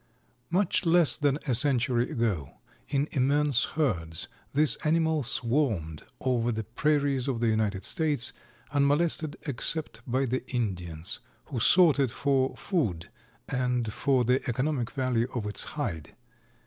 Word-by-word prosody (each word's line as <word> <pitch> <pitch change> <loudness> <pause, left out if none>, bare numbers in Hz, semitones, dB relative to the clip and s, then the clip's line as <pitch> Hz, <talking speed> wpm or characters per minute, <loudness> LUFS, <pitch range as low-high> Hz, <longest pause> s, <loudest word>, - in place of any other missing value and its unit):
Much 185 +2 +1
less 170 -2 +4
than 145 -1 +1
a 130 - 0
century 125 -1 +2
ago, 100 - -2 0.3
in 140 +1 0
immense 140 -1 +2
herds, 85 - -1 0.2
this 150 +1 +5
animal 160 0 +1
swarmed 115 - -1 0.2
over 120 -2 0
the 110 -1 -3
prairies 140 +2 0
of 130 -4 -1
the 120 - 0
United 105 -3 0
States, 150 -7 0 0.4
unmolested 150 +2 +1
except 140 -2 0
by 130 +2 0
the 130 0 -2
Indians 90 -9 -3 0.3
who 125 - -4
sought 165 +3 +5
it 135 -3 +2
for 135 +2 0
food 110 - -2 0.4
and 125 -4 -1
for 130 0 +1
the 125 +3 +2
economic 130 0 -1
value 130 -3 0
of 115 -4 -2
its 105 - -1
hide. 90 - -4
130 Hz, 135 wpm, -28 LUFS, 115-145 Hz, 0.4 s, this